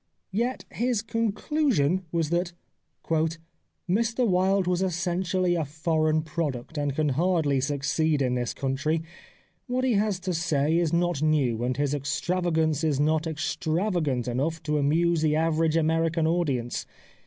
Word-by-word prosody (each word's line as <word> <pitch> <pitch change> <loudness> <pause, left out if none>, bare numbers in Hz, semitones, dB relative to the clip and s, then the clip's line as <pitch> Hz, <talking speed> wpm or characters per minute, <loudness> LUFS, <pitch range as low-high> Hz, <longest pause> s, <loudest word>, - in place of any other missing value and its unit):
Yet 240 +6 -1
his 235 -2 0
conclusion 225 - 0
was 165 -2 -1
that 175 0 0 0.3
" - - -33 0.8
Mr 230 +6 +1
Wilde 190 0 +2
was 180 0 0
essentially 180 0 0
a 170 -2 0
foreign 155 +1 0
product 150 -3 -4
and 145 -2 -1
can 155 -1 +1
hardly 150 -2 +1
succeed 145 +2 0
in 130 -2 +1
this 120 -1 -2
country. 145 +4 -1 0.6
What 255 +1 -1
he 260 -2 +2
has 205 -2 +1
to 185 -1 -2
say 160 -2 +1
is 170 -2 +2
not 175 -3 +1
new, 135 -7 +1
and 125 +1 -1
his 145 0 0
extravagance 160 +2 0
is 150 -4 +1
not 155 +2 +1
extra 160 +4 -1
vagant 140 -9 -1
enough 150 +7 -2
to 150 -1 0
amuse 165 +3 +2
the 155 -1 +2
average 160 0 +2
American 165 0 +1
audience. 145 -8 -1
160 Hz, 145 wpm, -26 LUFS, 145-180 Hz, 0.8 s, Wilde